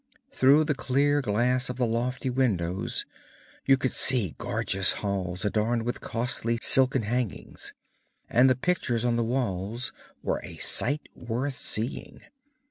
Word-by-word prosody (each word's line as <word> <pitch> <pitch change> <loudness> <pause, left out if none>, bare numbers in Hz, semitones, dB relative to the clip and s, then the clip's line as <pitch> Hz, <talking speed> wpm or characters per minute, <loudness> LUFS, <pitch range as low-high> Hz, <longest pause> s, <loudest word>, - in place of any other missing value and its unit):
Through 140 +4 +5
the 150 -1 0
clear 145 +2 +1
glass 125 +2 +1
of 125 - -3
the 125 0 0
lofty 125 +3 -2
windows 95 -8 -1 0.6
you 135 -1 +6
could 130 -1 -1
see 115 - +3
gorgeous 110 -5 +1
halls 95 -2 -3
adorned 110 +3 0
with 120 +1 -4
costly 115 -1 -1
silken 130 -1 +4
hangings, 120 -1 -4 0.5
and 125 +3 +4
the 130 - +3
pictures 125 -6 -1
on 120 -1 +2
the 120 - +1
walls 115 -1 -2 0.3
were - - -1
a - - -9
sight 145 +4 +1
worth 125 +4 -3
seeing. 110 +4 -2
120 Hz, 135 wpm, -27 LUFS, 110-130 Hz, 0.6 s, you